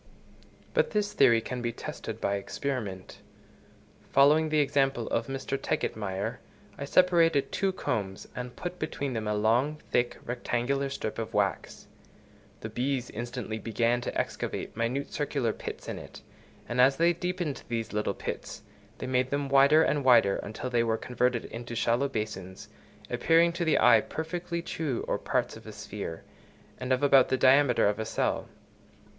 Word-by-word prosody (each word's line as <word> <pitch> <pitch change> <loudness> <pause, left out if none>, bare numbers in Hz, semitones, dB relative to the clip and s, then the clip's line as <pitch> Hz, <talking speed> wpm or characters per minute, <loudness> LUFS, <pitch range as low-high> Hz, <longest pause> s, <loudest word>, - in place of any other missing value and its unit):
But - - +2
this 210 -1 -1
theory 120 -4 +5
can 125 +2 -5
be 120 0 -1
tested - - -7
by 100 - 0
experiment. 100 -3 -5 0.9
Following 150 +3 +5
the 155 - +1
example 135 -4 +1
of - - -1
Mr. 135 0 -3
Tegetmeier, 100 -2 -2 0.4
I 140 - -5
separated 165 -3 +3
two 195 -1 +1
combs, 100 - -3
and 125 0 -6
put 180 0 -6
between 140 -4 -3
them 110 -2 -3
a 105 - 0
long, 120 +8 +2
thick, 120 0 +1
rectangular 125 +3 -1
strip 110 -5 -4
of 115 -2 -5
wax: 100 -1 -1 0.8
the 110 - -5
bees 125 +2 -2
instantly 120 -1 -5
began 115 +2 0
to - - -4
excavate - - -3
minute 120 +5 -2
circular 140 -6 -1
pits - - -7
in - - -4
it; - - -12 0.4
and 120 +1 +2
as 135 +2 +5
they 170 +1 +4
deepened 180 -4 -3
these 115 -2 -3
little 105 -2 -1
pits, - - -6 0.3
they - - -5
made 130 0 +1
them 140 0 -1
wider 140 +3 +6
and 145 -2 +1
wider 115 -6 +5
until 115 +4 -5
they 120 -1 +3
were 115 -1 +1
converted 125 0 0
into 120 +1 -7
shallow 120 +4 +1
basins, 105 -6 -5 0.4
appearing 170 +1 +4
to 170 +1 -2
the 160 -2 +3
eye 115 -2 +6
perfectly 170 +3 -4
true 150 -8 -3
or - - 0
parts - - -1
of - - -13
a - - -7
sphere, 80 0 -7 0.6
and 130 0 -4
of 130 +2 +2
about 135 -2 +6
the 130 - +2
diameter 130 -2 +5
of 105 +1 0
a 110 - -2
cell. - - -1
125 Hz, 160 wpm, -28 LUFS, 115-145 Hz, 0.9 s, wider